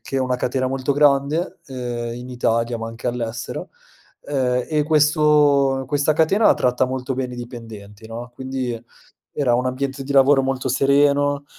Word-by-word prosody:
che 135 - -5
è - - 0
una 130 -1 0
catena 130 +1 -1
molto 135 +1 -1
grande, 145 +3 +2
ehm, 120 -3 -5
in 125 +1 -8
Italia 115 -1 0
ma 115 - -5
anche 115 +2 -8
all'estero, 120 -1 -5 0.5
ehm, 125 -3 -1
e 155 -1 +1
questo 150 -3 +3
questa 145 +2 +1
catena 190 +8 +4
tratta 125 +1 +1
molto 130 0 -3
bene 125 -1 -4
i - - -10
dipendenti, 110 -4 -10
no. 120 +2 -8
Quindi 130 -1 -4 0.6
era 130 -5 +1
un 125 - -1
ambiente 135 +2 -3
di 140 - -4
lavoro 135 0 +5
molto 130 0 -2
sereno, 140 +2 +2
130 Hz, 160 wpm, -21 LUFS, 125-140 Hz, 0.6 s, lavoro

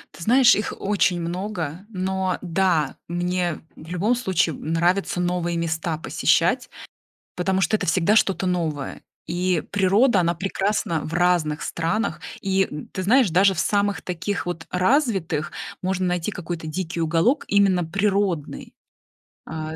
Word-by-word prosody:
Ты - - -13
знаешь, 245 +5 +6
их 210 - -2
очень 185 -3 +1
много, 175 0 -4
но 190 -2 -1
да, 175 -4 +1
мне 175 -1 -1 0.2
в 155 - -13
любом 190 +7 +1
случае, 185 - 0
м, 160 - -6
нравится 175 +2 +1
новые 175 -1 -1
места 160 -1 -2
посещать, - - +1 0.7
потому 190 +1 0
что 195 - +2
это - - -2
всегда 180 +5 +2
что-то 195 -3 +2
новое, 160 -6 -2 0.3
и 180 -1 0
природа, 205 +2 +3
она 170 0 +1
прекрасна 190 -2 -1
в 155 - -6
разных 175 -3 +1
странах. 170 +7 -2 0.2
И, 195 0 +2
м, 150 0 -7
ты 185 - -3
знаешь, 240 +2 +4
даже 195 +3 +4
в 170 - -4
самых 205 -1 +1
таких 180 +1 -3
вот 175 -2 -4
развитых 185 - +1 0.3
можно 185 0 -1
найти 180 +2 -1
какой-то 175 -4 -6
дикий 170 +1 -3
уголок, 165 - +2
именно 195 -3 +3
природный, 195 -2 -1 0.7
а, 155 0 -5
180 Hz, 145 wpm, -23 LUFS, 165-195 Hz, 0.7 s, знаешь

